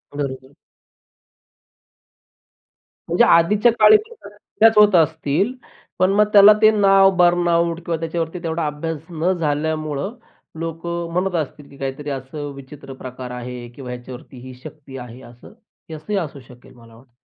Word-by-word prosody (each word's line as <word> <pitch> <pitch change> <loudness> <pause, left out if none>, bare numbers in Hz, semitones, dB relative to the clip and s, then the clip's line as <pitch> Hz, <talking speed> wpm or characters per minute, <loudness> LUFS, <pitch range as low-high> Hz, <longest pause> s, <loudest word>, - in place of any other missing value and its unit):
बरोबर. 135 -1 -5 2.6
म्हणजे - - +3
आधीच्या 205 +8 +4
काळी 430 - +8
ते 445 +2 -12
करतच 215 +2 0
होत 210 -2 +6
असतील, 160 - +1 0.5
पण 185 +1 +3
मग 210 +1 +4
त्याला 205 +1 +9
ते 215 0 +7
नाव 195 -2 +5
बर्नआउट 170 -1 +2
किंवा 165 -1 -2
त्याच्यावरती 165 +1 -4
तेवढा 165 -1 -2
अभ्यास 150 +2 -4
न 170 +2 -1
झाल्यामुळं 155 - -2 0.4
लोक 165 0 -6 0.3
म्हणत 180 +1 -1
असतील, 150 -2 -5
की 140 - -16
काहीतरी 135 +2 -5
असं 140 +2 -6
विचित्र 140 0 -11
प्रकार 130 -1 -9
आहे 125 0 -7
किंवा 130 -2 -9
ह्याच्यावरती 125 +1 -10
ही 130 - -9
शक्ती 145 -3 -11
आहे 125 0 -10
असं. 120 +6 -15 0.4
हे 160 - -6
असंही 175 +7 -4
असू 150 -5 -6
शकेल 125 +1 -17
मला 115 -2 -18
वाटतं. 120 +1 -21
155 Hz, 140 wpm, -20 LUFS, 135-175 Hz, 2.6 s, त्याला